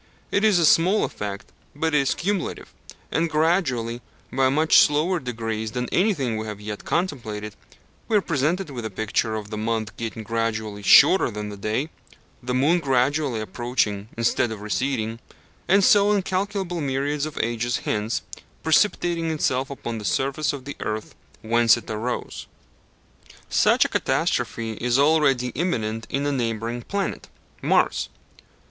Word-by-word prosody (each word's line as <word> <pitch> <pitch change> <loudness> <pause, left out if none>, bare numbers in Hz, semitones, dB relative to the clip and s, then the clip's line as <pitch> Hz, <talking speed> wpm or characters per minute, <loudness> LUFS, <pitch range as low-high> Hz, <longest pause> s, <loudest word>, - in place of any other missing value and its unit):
It 200 - +1
is 215 -4 +5
a 170 - +4
small 180 +7 +4
effect, 100 -1 -6 0.2
but 160 +2 -1
it 150 - +5
is 135 -1 +1
cumulative; 195 0 -3 0.4
and 165 +1 +1
gradually, 145 -8 0 0.3
by 130 0 +3
much 155 +4 +5
slower 160 +5 +3
degrees 115 -4 -4
than 125 0 -2
anything 155 - +1
we 110 0 -4
have 105 -1 -6
yet 105 0 -6
contemplated, 110 - -3 0.5
we 220 - +3
are - - +3
presented 165 +2 -1
with 120 -3 -6
a 110 - -3
picture 110 +2 -1
of 105 -1 -6
the 110 - -4
month 110 -1 -2
getting 115 -1 -5
gradually 110 -1 -2
shorter 155 - +6
than 105 -1 -5
the 105 - -7
day, 110 +10 -2 0.5
the 125 0 -2
moon 150 +7 +3
gradually 135 -3 +1
approaching 110 -3 -2
instead 115 0 +1
of 110 -2 -6
receding, 115 +2 -2 0.5
and 195 +2 +4
so, 205 +1 +5
incalculable 190 -2 -1
myriads 140 +2 -1
of 155 - -10
ages 120 +1 -1
hence, 105 +2 -1 0.4
precipitating 165 -1 +2
itself 135 -4 0
upon 120 -5 -5
the - - -8
surface 140 +9 0
of 140 -3 -8
the 145 - -6
earth 110 0 -4 0.3
whence 115 +1 +4
it 120 - -10
arose. 115 +3 -4 1.0
Such - - +4
a - - -1
catastrophe 115 -1 -1
is 125 +1 +2
already 140 -4 +3
imminent 115 -8 -2
in 140 +1 -1
a 145 - +1
neighbouring 115 -2 -2
planet 200 +10 -3 0.3
Mars. - - +2
125 Hz, 150 wpm, -24 LUFS, 110-160 Hz, 1.0 s, shorter